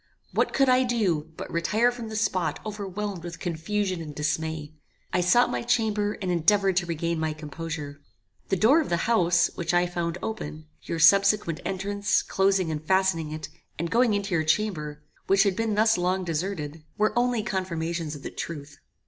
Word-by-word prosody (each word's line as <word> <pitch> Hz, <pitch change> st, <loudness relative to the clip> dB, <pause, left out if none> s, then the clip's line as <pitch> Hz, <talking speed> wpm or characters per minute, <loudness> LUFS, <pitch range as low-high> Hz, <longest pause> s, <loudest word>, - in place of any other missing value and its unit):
What -, -, +1 dB
could 270 Hz, 0 st, +3 dB
I 255 Hz, 0 st, +5 dB
do, 195 Hz, -11 st, 0 dB
but -, -, -7 dB
retire 215 Hz, +8 st, +2 dB
from 240 Hz, -2 st, -7 dB
the 220 Hz, -, -6 dB
spot 185 Hz, -8 st, 0 dB
overwhelmed 200 Hz, -3 st, -4 dB
with 170 Hz, -1 st, -7 dB
confusion 185 Hz, +2 st, -2 dB
and 150 Hz, -2 st, -8 dB
dismay? 155 Hz, 0 st, -2 dB, 0.4 s
I 180 Hz, -, +3 dB
sought 185 Hz, +8 st, +4 dB
my -, -, -1 dB
chamber, 215 Hz, -4 st, +1 dB
and 185 Hz, -, 0 dB
endeavoured 190 Hz, +3 st, +3 dB
to 175 Hz, -2 st, +1 dB
regain 170 Hz, 0 st, -1 dB
my 160 Hz, -1 st, -1 dB
composure. 150 Hz, -1 st, -6 dB, 0.5 s
The 195 Hz, -, +2 dB
door 235 Hz, -, +5 dB
of 305 Hz, -, -4 dB
the 170 Hz, -1 st, 0 dB
house, 175 Hz, -7 st, +3 dB
which 170 Hz, 0 st, -1 dB
I 175 Hz, 0 st, +4 dB
found 175 Hz, -1 st, -3 dB
open, 155 Hz, -8 st, -5 dB, 0.2 s
your 165 Hz, -, -4 dB
subsequent 195 Hz, 0 st, +4 dB
entrance, 200 Hz, +2 st, 0 dB
closing, 190 Hz, -3 st, +1 dB
and 155 Hz, 0 st, -4 dB
fastening 190 Hz, -3 st, +1 dB
it, 155 Hz, 0 st, -6 dB, 0.3 s
and 170 Hz, +1 st, -3 dB
going 235 Hz, -1 st, +3 dB
into 200 Hz, -1 st, -2 dB
your 160 Hz, -2 st, +2 dB
chamber, 155 Hz, -4 st, -1 dB, 0.2 s
which 195 Hz, 0 st, +5 dB
had 200 Hz, -3 st, +1 dB
been 225 Hz, 0 st, 0 dB
thus 215 Hz, -2 st, +3 dB
long 185 Hz, +1 st, 0 dB
deserted, 165 Hz, -2 st, -3 dB
were 215 Hz, 0 st, +2 dB
only 240 Hz, -2 st, +1 dB
confirmations 170 Hz, -5 st, -3 dB
of 140 Hz, -, -11 dB
the -, -, -5 dB
truth. 145 Hz, -3 st, -7 dB
180 Hz, 180 wpm, -26 LUFS, 160-210 Hz, 0.5 s, I